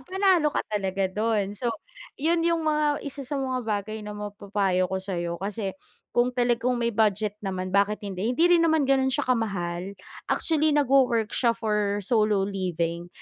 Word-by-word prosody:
panalo 370 Hz, 0 st, +2 dB
ka -, -, -2 dB
talaga 195 Hz, -2 st, -1 dB
dun. 210 Hz, -2 st, 0 dB
So 235 Hz, +4 st, -3 dB, 0.5 s
yun 330 Hz, +4 st, +1 dB
yung 335 Hz, -1 st, +1 dB
mga 300 Hz, -1 st, +1 dB
1 280 Hz, 0 st, -5 dB
sa 275 Hz, +2 st, -4 dB
mga 260 Hz, -2 st, -1 dB
bagay 215 Hz, +1 st, -2 dB
na 210 Hz, 0 st, -7 dB
mapapayo 200 Hz, -3 st, -1 dB
ko 190 Hz, -, -2 dB
sayo 175 Hz, -3 st, -3 dB
kasi 195 Hz, +1 st, -4 dB, 0.4 s
kung 240 Hz, +1 st, +3 dB
talagang 245 Hz, 0 st, +1 dB
may 235 Hz, -1 st, 0 dB
budget 210 Hz, -1 st, +1 dB
naman 185 Hz, -2 st, -4 dB
bakit 200 Hz, +1 st, +1 dB
hindi, 195 Hz, +1 st, -3 dB
hindi 255 Hz, +7 st, +2 dB
rin 350 Hz, -1 st, +5 dB
naman 320 Hz, -3 st, +3 dB
ganun 265 Hz, 0 st, +3 dB
siya 275 Hz, +2 st, 0 dB
kamahal, 195 Hz, -6 st, -2 dB, 0.3 s
actually 310 Hz, -1 st, +2 dB
nag-wo-work 265 Hz, -6 st, +3 dB
siya 235 Hz, -2 st, +1 dB
for 210 Hz, -2 st, -1 dB
solo 210 Hz, -2 st, +2 dB
living, 175 Hz, -3 st, -3 dB
215 Hz, 165 wpm, -26 LUFS, 195-265 Hz, 0.5 s, rin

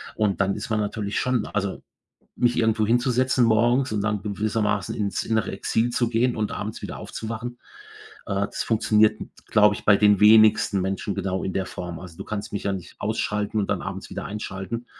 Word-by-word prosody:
Und 105 Hz, -3 st, +1 dB
dann 100 Hz, 0 st, +1 dB
ist 105 Hz, -, -6 dB
man 110 Hz, -1 st, +1 dB
natürlich 105 Hz, -1 st, -2 dB
schon 125 Hz, -4 st, 0 dB
also, 100 Hz, -2 st, -3 dB, 0.5 s
mich 120 Hz, -1 st, +1 dB
irgendwo 110 Hz, -2 st, +2 dB
hinzusetzen 125 Hz, +1 st, +2 dB
morgens 120 Hz, +4 st, +3 dB
und 105 Hz, -1 st, -1 dB
dann 105 Hz, -1 st, -1 dB
gewissermaßen 105 Hz, -1 st, -1 dB
ins 100 Hz, -2 st, -1 dB
innere 110 Hz, -2 st, 0 dB
Exil 110 Hz, +4 st, 0 dB
zu 120 Hz, -1 st, +1 dB
gehen 120 Hz, +2 st, +1 dB
und 105 Hz, -1 st, -2 dB
abends 105 Hz, +1 st, -5 dB
wieder -, -, -6 dB
aufzuwachen. 115 Hz, +2 st, -6 dB, 0.7 s
Äh, 100 Hz, -, -2 dB
das -, -, -5 dB
funktioniert, 110 Hz, -1 st, +3 dB, 0.3 s
glaube 105 Hz, -2 st, +5 dB
ich, -, -, -8 dB
bei 105 Hz, -1 st, +5 dB
den 105 Hz, -2 st, +4 dB
wenigsten 110 Hz, -1 st, +6 dB
Menschen 95 Hz, +1 st, -2 dB
genau 95 Hz, -1 st, -2 dB
in 95 Hz, -, -3 dB
der 95 Hz, -, -1 dB
Form. 85 Hz, -2 st, -6 dB
Also, 85 Hz, -2 st, -11 dB
du -, -, -6 dB
kannst 105 Hz, 0 st, -5 dB
mich 100 Hz, -, -4 dB
ja 100 Hz, -, +1 dB
nicht 95 Hz, -3 st, -7 dB
ausschalten 105 Hz, 0 st, -2 dB
und 105 Hz, -, 0 dB
dann -, -, -1 dB
abends -, -, -6 dB
wieder -, -, -5 dB
einschalten. 105 Hz, +3 st, -5 dB
105 Hz, 190 wpm, -24 LUFS, 100-115 Hz, 0.7 s, wenigsten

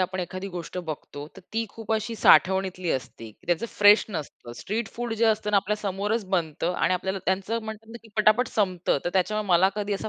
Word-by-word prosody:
आपण 185 Hz, 0 st, -1 dB
एखादी 185 Hz, +2 st, -5 dB
गोष्ट 180 Hz, 0 st, -6 dB
बघतो. 150 Hz, -3 st, -7 dB
तर -, -, -11 dB
ती 225 Hz, +1 st, 0 dB
खूप 225 Hz, -1 st, -5 dB
अशी 220 Hz, +1 st, -1 dB
साठवणीतली 190 Hz, -3 st, +4 dB
असते. 115 Hz, -3 st, -4 dB, 0.2 s
त्याचं 175 Hz, +6 st, 0 dB
फ्रेश 205 Hz, +1 st, +7 dB
नसतं 150 Hz, -, -7 dB
स्ट्रीट 215 Hz, +1 st, -3 dB
फूड 240 Hz, -1 st, -3 dB
जे 230 Hz, +1 st, +1 dB
असतं 220 Hz, -1 st, +1 dB
ना 210 Hz, -, +3 dB
आपल्या 200 Hz, +2 st, +1 dB
समोरच 205 Hz, +2 st, -2 dB
बनत. 165 Hz, -6 st, -1 dB
आणि 180 Hz, +1 st, +1 dB
आपल्याला 190 Hz, +2 st, -2 dB
त्यांचं 195 Hz, +5 st, -1 dB
म्हणतात 220 Hz, 0 st, -8 dB
ना 235 Hz, -, -8 dB
की 230 Hz, -, -16 dB
पटापट 215 Hz, +4 st, +4 dB
संपतं 185 Hz, -7 st, 0 dB
तर 175 Hz, -, 0 dB
त्याच्यामुळे 210 Hz, +2 st, 0 dB
मला 180 Hz, +1 st, +5 dB
कधी 210 Hz, -1 st, -2 dB
असा 200 Hz, -, -4 dB
195 Hz, 200 wpm, -26 LUFS, 180-215 Hz, 0.2 s, फ्रेश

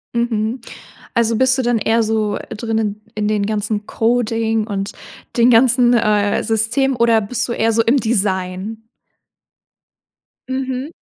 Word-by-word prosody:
Mhm. 235 Hz, 0 st, -1 dB, 0.5 s
Also, 230 Hz, -1 st, +2 dB
bist 260 Hz, +1 st, +3 dB
du 260 Hz, -, 0 dB
dann 240 Hz, -1 st, +1 dB
eher 225 Hz, +2 st, +1 dB
so 215 Hz, -1 st, -1 dB
drinnen 220 Hz, -2 st, -2 dB
in 210 Hz, -1 st, -1 dB
den 210 Hz, -1 st, 0 dB
ganzen 210 Hz, 0 st, -2 dB
Coding 225 Hz, -1 st, 0 dB
und 200 Hz, -1 st, -4 dB, 0.4 s
den 235 Hz, +1 st, +5 dB
ganzen, 245 Hz, +1 st, +4 dB
äh, 210 Hz, -3 st, +2 dB
System 235 Hz, +5 st, 0 dB
oder 230 Hz, -1 st, +3 dB
bist 240 Hz, +4 st, -2 dB
du -, -, -2 dB
eher 225 Hz, -1 st, +1 dB
so 230 Hz, +1 st, +3 dB
im 240 Hz, +5 st, +2 dB
Design? 200 Hz, -1 st, -2 dB, 1.6 s
Mhm. 260 Hz, +2 st, -3 dB
225 Hz, 135 wpm, -18 LUFS, 215-240 Hz, 1.6 s, den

